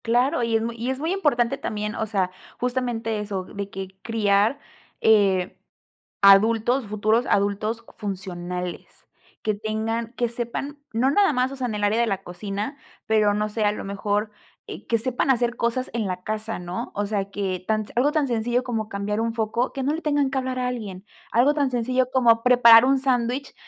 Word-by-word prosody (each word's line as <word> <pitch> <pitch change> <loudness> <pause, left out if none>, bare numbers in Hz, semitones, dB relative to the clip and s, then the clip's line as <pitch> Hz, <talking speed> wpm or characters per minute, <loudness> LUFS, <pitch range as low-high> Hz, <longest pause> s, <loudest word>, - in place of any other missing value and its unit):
Claro, 245 +6 +2
y 230 -1 0
es 225 - +2
muy 230 0 -3
y 235 +3 -3
es 265 - -1
muy 320 +4 -1
importante 275 -9 +1
también, 210 -4 -3
o 220 - -3
sea, 190 -3 0 0.3
justamente 240 -3 -1
eso, 200 -3 -3
de 200 +1 -7
que 190 -1 -7
criar, 215 +2 +2 0.4
eh, 195 -4 +3 0.7
adultos, 220 +5 +5
futuros 215 +3 +1
adultos 210 +3 0
funcionales. 180 -3 -6 0.4
Que 215 - +1
tengan 220 +2 -3
que 240 0 0
sepan, 240 +5 -5
no 235 +4 +2
nada 395 +2 +4
más, 255 +1 +1
o - - -6
sea, 260 -2 -2
en 220 - -3
el 205 - -3
área 220 +3 +2
de 235 - +2
la 195 -2 -2
cocina, 200 +9 -5 0.3
pero 215 -2 +3
no 210 0 0
sé, 215 +1 -2
a 205 - +3
lo 210 - -6
mejor, 205 +2 -1 0.4
eh, - - -8
que 230 - +2
sepan 250 +3 -1
hacer 240 -2 +2
cosas 235 +2 -1
en 230 -2 -1
la 180 -1 -4
casa, 215 +1 -3
¿no? 175 0 -5
O 205 - -1
sea, 200 -1 -2
que 190 -2 -3
tan 215 +1 0
algo 265 +5 +3
tan 300 -2 +1
sencillo 240 +1 0
como 225 -4 -3
cambiar 205 +1 -2
un 230 0 -1
foco, 230 +2 -1
que 270 - -4
no 285 +3 +1
le 325 - -3
tengan 290 -3 +1
que 275 - -1
hablar 260 -1 -2
a 250 - 0
alguien, 210 -6 -5 0.3
algo 250 +6 +4
tan 285 -3 0
sencillo 255 +1 0
como 235 -3 +4
preparar 240 -2 +8
un 270 +1 +3
sándwich, 255 0 -1
225 Hz, 195 wpm, -24 LUFS, 205-250 Hz, 0.7 s, preparar